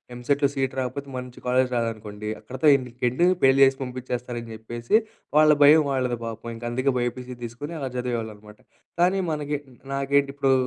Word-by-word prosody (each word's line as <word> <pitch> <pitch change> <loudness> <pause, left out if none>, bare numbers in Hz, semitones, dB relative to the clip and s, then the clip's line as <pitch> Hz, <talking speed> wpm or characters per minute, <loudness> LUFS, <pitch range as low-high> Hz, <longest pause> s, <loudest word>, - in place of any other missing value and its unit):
ఎంసెట్‌లో 140 +3 +1
సీట్ 135 -1 -1
రాపోతే 130 +2 -4
మంచి 125 -1 -8
కాలేజీ 125 +1 +3
రాదనుకోండి 110 -3 -3
అక్కడితో 130 +4 +1
ఎండుకి 125 -2 -5
ఎండు. 150 +9 +2 0.2
పెళ్లి 135 0 +5
చేసి 135 0 +4
పంపించేస్తారని 125 -2 -5
చెప్పేసి 120 - -2 0.4
వాళ్ళ 155 0 +7
భయం 155 +2 +7
వాళ్ళది 125 -3 -1
పాపం. 115 0 -7
ఇంక 115 - -11
అందుకే 130 +2 +1
బైపీసీ 125 +1 -3
తీసుకొని 145 +8 -6
అలా 135 -2 -3
చదివేవాళ్ళనమాట. 110 -4 -5 0.4
కానీ 185 +2 +3
మనకి, 150 -1 -2 0.4
నాకేంటి 140 0 +1
ఇప్పుడు 135 -1 +3
125 Hz, 150 wpm, -25 LUFS, 120-140 Hz, 0.4 s, వాళ్ళ